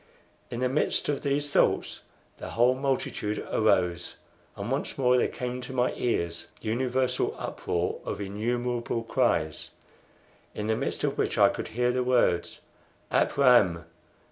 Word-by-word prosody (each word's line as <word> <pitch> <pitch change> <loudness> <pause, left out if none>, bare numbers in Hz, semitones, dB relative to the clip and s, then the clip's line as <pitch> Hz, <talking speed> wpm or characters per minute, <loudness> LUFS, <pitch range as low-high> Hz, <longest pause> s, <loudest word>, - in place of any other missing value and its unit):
In 120 - -4
the 130 - +3
midst 135 +3 0
of 145 - -1
these 145 0 -1
thoughts - - +2 0.4
the - - -6
whole 120 +2 +3
multitude 130 -5 -2
arose; 90 -5 +1 0.4
and 100 +5 -5
once 135 +2 -2
more 125 -2 +3
there 125 - +3
came 125 0 -5
to 130 - -7
my 125 -1 +1
ears 85 -8 -2
the 110 - -5
universal 125 +2 0
uproar 85 0 -2
of - - -4
innumerable 120 +3 -2
cries, 110 - 0 0.9
in 105 - -3
the 110 0 +1
midst - - -3
of - - -1
which - - 0
I - - +6
could - - -4
hear 125 +1 0
the 125 0 0
words, 125 -8 +1 0.5
"Ap - - +1
Ram!" 105 - +5
125 Hz, 150 wpm, -27 LUFS, 105-130 Hz, 0.9 s, I